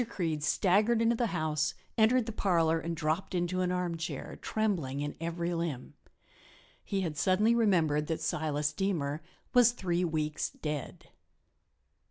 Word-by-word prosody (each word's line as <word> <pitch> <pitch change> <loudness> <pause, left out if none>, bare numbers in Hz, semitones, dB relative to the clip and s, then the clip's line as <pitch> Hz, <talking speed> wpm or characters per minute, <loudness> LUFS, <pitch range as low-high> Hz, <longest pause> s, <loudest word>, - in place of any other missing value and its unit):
Creede 165 -8 -2
staggered 205 +9 +3
into 230 +1 +3
the 235 0 +1
house, 155 -5 -1 0.2
entered 230 +2 +4
the 225 - -4
parlor 165 -6 +2
and 165 +1 -3
dropped 160 +5 -1
into 180 +1 0
an 180 0 +1
armchair, 175 -2 -3
trembling 175 -12 -1
in 145 0 -3
every 170 +1 -2
limb. 165 -7 -3 0.9
He 195 -1 -1
had 165 -5 -2
suddenly 200 +8 +3
remembered 165 -10 +2
that 160 - -1
Silas 150 -1 -1
Deemer 155 -5 -1 0.3
was 240 -1 +6
three 180 -6 -1
weeks 155 -3 -1
dead. 150 -3 -6
170 Hz, 140 wpm, -31 LUFS, 155-195 Hz, 0.9 s, was